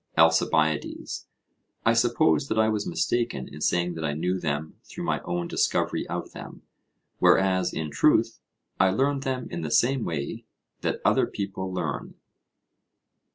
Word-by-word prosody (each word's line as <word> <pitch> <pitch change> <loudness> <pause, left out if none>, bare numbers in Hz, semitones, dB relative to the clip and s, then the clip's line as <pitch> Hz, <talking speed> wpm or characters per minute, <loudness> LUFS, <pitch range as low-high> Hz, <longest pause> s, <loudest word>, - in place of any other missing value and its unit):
ALCIBIADES: 80 -1 +2 0.6
I 115 - +5
suppose 120 +5 +3
that 110 - -2
I 110 0 +4
was 105 -1 -1
mistaken 115 - -1
in 75 - -11
saying 90 +2 +1
that 80 -1 -6
I 75 -1 0
knew 90 +4 -1
them 80 -2 -3
through - - -8
my - - -1
own 85 0 -2
discovery - - 0
of - - -4
them; - - -10 0.6
whereas, 95 -2 +4
in 75 -2 -4
truth, - - +3 0.4
I 95 - +5
learned 135 +8 +1
them 130 -2 -3
in 85 - -4
the 80 - -3
same 130 - +2
way 75 -4 -4 0.4
that - - -2
other - - +4
people 95 -2 -4
learn. 90 - -4
90 Hz, 150 wpm, -26 LUFS, 80-115 Hz, 0.6 s, I